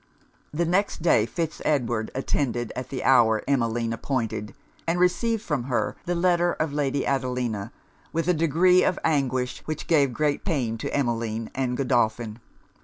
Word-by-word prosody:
The 170 Hz, +3 st, 0 dB
next 180 Hz, 0 st, 0 dB
day, 115 Hz, -10 st, +4 dB
Fitz 165 Hz, +6 st, -3 dB
Edward 120 Hz, -7 st, 0 dB
attended 120 Hz, -3 st, -1 dB
at 125 Hz, -, -5 dB
the 130 Hz, -, -4 dB
hour 115 Hz, -4 st, +4 dB
Emmeline 115 Hz, -4 st, 0 dB
appointed, 115 Hz, -4 st, -3 dB, 0.3 s
and 170 Hz, +2 st, +1 dB
received 215 Hz, +5 st, +1 dB
from 145 Hz, -, -2 dB
her 125 Hz, -2 st, -1 dB
the 175 Hz, -, -1 dB
letter 175 Hz, 0 st, +2 dB
of 155 Hz, -2 st, -2 dB
Lady 140 Hz, -1 st, 0 dB
Adelina, 125 Hz, -6 st, -1 dB, 0.4 s
with 165 Hz, +1 st, -1 dB
a 180 Hz, -, +4 dB
degree 170 Hz, +3 st, +4 dB
of -, -, +1 dB
anguish 130 Hz, -5 st, 0 dB
which 155 Hz, -1 st, -4 dB
gave 145 Hz, -5 st, +3 dB
great 150 Hz, +3 st, 0 dB
pain 125 Hz, -, -1 dB
to -, -, -4 dB
Emmeline 115 Hz, -4 st, -1 dB
and 130 Hz, -2 st, -1 dB
Godolphin. 120 Hz, -4 st, 0 dB
135 Hz, 155 wpm, -25 LUFS, 120-165 Hz, 0.4 s, day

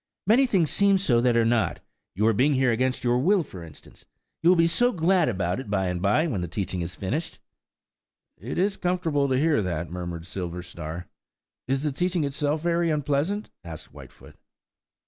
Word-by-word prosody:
"Many 245 Hz, +7 st, +4 dB
things 180 Hz, -, +1 dB
seem 200 Hz, -1 st, +4 dB
so 125 Hz, -11 st, +2 dB
that 120 Hz, -1 st, +3 dB
are 115 Hz, -, +3 dB
not; 115 Hz, -2 st, +1 dB, 0.4 s
your 110 Hz, +4 st, +3 dB
being 135 Hz, +8 st, +3 dB
here 130 Hz, -2 st, +2 dB
against 130 Hz, +3 st, 0 dB
your 120 Hz, 0 st, +2 dB
will 185 Hz, +6 st, +3 dB
for 90 Hz, -, -10 dB
instance–you 85 Hz, -, -6 dB
will 185 Hz, -, +6 dB
be 165 Hz, -, +5 dB
so 245 Hz, +9 st, +2 dB
glad 175 Hz, -, +2 dB
about 90 Hz, -2 st, -1 dB
it 130 Hz, -, -8 dB
by 95 Hz, -2 st, 0 dB
and 90 Hz, -1 st, -3 dB
by, 105 Hz, -, +2 dB
when 115 Hz, -, -2 dB
the 90 Hz, -, -3 dB
teaching 90 Hz, 0 st, -3 dB
is 85 Hz, +1 st, -5 dB
finished." 150 Hz, -, -3 dB, 1.0 s
"It 115 Hz, +10 st, -6 dB
is 195 Hz, +2 st, +1 dB
comfortable 165 Hz, -6 st, 0 dB
to 130 Hz, -, +2 dB
hear 150 Hz, -3 st, +2 dB
that," 85 Hz, -3 st, -3 dB
murmured 85 Hz, -2 st, -5 dB
Silverstar. 90 Hz, -2 st, -6 dB, 0.6 s
"Is 135 Hz, +2 st, 0 dB
the 150 Hz, -, 0 dB
teaching 175 Hz, +3 st, 0 dB
itself 145 Hz, +2 st, -1 dB
very 170 Hz, 0 st, +1 dB
unpleasant?" 150 Hz, +7 st, -1 dB
asked 80 Hz, -3 st, -9 dB
Whitefoot. -, -, -14 dB
130 Hz, 180 wpm, -25 LUFS, -, 1.0 s, will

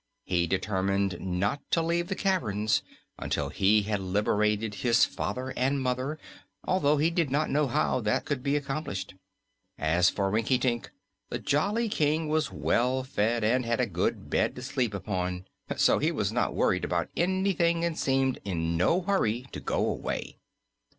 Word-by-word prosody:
He 85 Hz, -1 st, +1 dB
determined 95 Hz, 0 st, 0 dB
not 95 Hz, +8 st, -1 dB
to -, -, +2 dB
leave 170 Hz, +1 st, 0 dB
the 190 Hz, -, -2 dB
caverns 110 Hz, -, +1 dB, 0.4 s
until -, -, -2 dB
he 105 Hz, +2 st, +3 dB
had 105 Hz, 0 st, -1 dB
liberated 105 Hz, +2 st, 0 dB
his 115 Hz, +2 st, +4 dB
father 130 Hz, +1 st, -4 dB
and 135 Hz, +2 st, +1 dB
mother, 130 Hz, +3 st, -1 dB, 0.5 s
although 150 Hz, -5 st, +2 dB
he 155 Hz, +4 st, +2 dB
did 165 Hz, -4 st, +1 dB
not 145 Hz, +4 st, +2 dB
then -, -, -4 dB
know 150 Hz, 0 st, +2 dB
how 130 Hz, +1 st, +1 dB
that 105 Hz, -1 st, 0 dB
could 145 Hz, -4 st, -2 dB
be 140 Hz, +2 st, 0 dB
accomplished. 135 Hz, -10 st, -3 dB, 0.6 s
As 85 Hz, +4 st, +3 dB
for 100 Hz, -1 st, -1 dB
Rinkitink, 120 Hz, +2 st, +1 dB, 0.4 s
the -, -, -2 dB
jolly 205 Hz, +11 st, +1 dB
King 155 Hz, -4 st, +1 dB
was 155 Hz, -1 st, 0 dB
well 130 Hz, +2 st, +1 dB
fed 115 Hz, -2 st, 0 dB
and 125 Hz, +4 st, +2 dB
had 115 Hz, 0 st, -1 dB
a 125 Hz, -, +3 dB
good 90 Hz, -5 st, -2 dB
bed -, -, +1 dB
to 125 Hz, -, -7 dB
sleep 125 Hz, -5 st, -1 dB
upon, 90 Hz, -2 st, -3 dB, 0.3 s
so -, -, +4 dB
he -, -, +1 dB
was -, -, -1 dB
not -, -, 0 dB
worrying -, -, +1 dB
about -, -, -1 dB
anything 175 Hz, -2 st, +1 dB
and 170 Hz, -2 st, -1 dB
seemed 135 Hz, -2 st, +1 dB
in 85 Hz, -4 st, -1 dB
no 130 Hz, -, +2 dB
hurry 130 Hz, -, 0 dB
to -, -, -6 dB
go -, -, 0 dB
away. -, -, -4 dB
125 Hz, 165 wpm, -28 LUFS, 100-150 Hz, 0.6 s, his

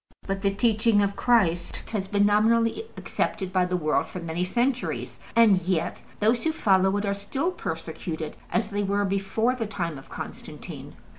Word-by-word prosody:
But 195 Hz, 0 st, -2 dB
the 200 Hz, -, +3 dB
teaching 215 Hz, 0 st, +3 dB
of 200 Hz, 0 st, -1 dB
Christ 175 Hz, -8 st, +1 dB
has 200 Hz, -4 st, -2 dB
been 205 Hz, 0 st, +3 dB
nominally 230 Hz, -, +3 dB
accepted 190 Hz, -2 st, -2 dB
by 185 Hz, -1 st, +3 dB
the 180 Hz, 0 st, 0 dB
world 155 Hz, -3 st, +1 dB
for 185 Hz, -, -7 dB
many 170 Hz, +1 st, -2 dB
centuries, 245 Hz, +6 st, -1 dB, 0.2 s
and 225 Hz, -4 st, +6 dB
yet 170 Hz, -2 st, -1 dB, 0.2 s
those 225 Hz, +3 st, +2 dB
who 320 Hz, -, +2 dB
follow 190 Hz, -, +3 dB
it 205 Hz, -, -1 dB
are 200 Hz, -, +1 dB
still 265 Hz, -, -2 dB
persecuted 160 Hz, -, -5 dB, 0.2 s
as 210 Hz, -, 0 dB
they 205 Hz, +1 st, 0 dB
were 200 Hz, 0 st, +1 dB
before 195 Hz, +5 st, +1 dB
the 230 Hz, -4 st, -3 dB
time 170 Hz, -8 st, -3 dB
of 135 Hz, -, -16 dB
Constantine. -, -, -8 dB
200 Hz, 170 wpm, -26 LUFS, 180-225 Hz, 0.2 s, and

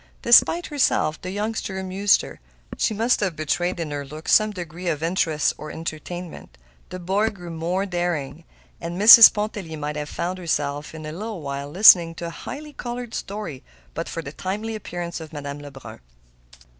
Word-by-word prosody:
Despite 330 Hz, +8 st, +5 dB
herself, 265 Hz, -, 0 dB
the 185 Hz, -, -6 dB
youngster 205 Hz, 0 st, -3 dB
amused 190 Hz, +1 st, +2 dB
her. -, -, -10 dB, 0.4 s
She -, -, 0 dB
must 225 Hz, +3 st, +1 dB
have 190 Hz, -5 st, -1 dB
betrayed 175 Hz, +4 st, -1 dB
in 160 Hz, -3 st, -4 dB
her 145 Hz, -1 st, -4 dB
look 155 Hz, +3 st, -11 dB
some 215 Hz, 0 st, +5 dB
degree 175 Hz, -3 st, -7 dB
of 155 Hz, -2 st, -1 dB
interest 165 Hz, -3 st, +1 dB
or 155 Hz, -, -7 dB
entertainment. 165 Hz, -, -7 dB, 0.3 s
The 185 Hz, -, -6 dB
boy 195 Hz, +5 st, 0 dB
grew 180 Hz, -5 st, -10 dB
more 170 Hz, +4 st, -2 dB
daring, 175 Hz, -4 st, -3 dB, 0.4 s
and 170 Hz, +2 st, -5 dB
Mrs. 225 Hz, +2 st, +11 dB
Pontellier 205 Hz, -6 st, -4 dB
might 150 Hz, 0 st, -4 dB
have 150 Hz, 0 st, -5 dB
found 180 Hz, +2 st, -4 dB
herself, 145 Hz, -3 st, -3 dB
in 155 Hz, -1 st, -8 dB
a 155 Hz, -, -5 dB
little 205 Hz, +2 st, -6 dB
while, 140 Hz, 0 st, -5 dB
listening 170 Hz, -1 st, +7 dB
to 170 Hz, -, -6 dB
a -, -, -4 dB
highly 295 Hz, -, -8 dB
colored 240 Hz, -2 st, -6 dB
story 195 Hz, -10 st, -6 dB, 0.3 s
but 165 Hz, -, -5 dB
for 165 Hz, -, -5 dB
the 140 Hz, -, -7 dB
timely 205 Hz, +7 st, -4 dB
appearance 175 Hz, -5 st, -6 dB
of 160 Hz, -1 st, -10 dB
Madame 145 Hz, -1 st, -6 dB
Lebrun. 140 Hz, -2 st, -11 dB
175 Hz, 175 wpm, -23 LUFS, 155-205 Hz, 0.4 s, Mrs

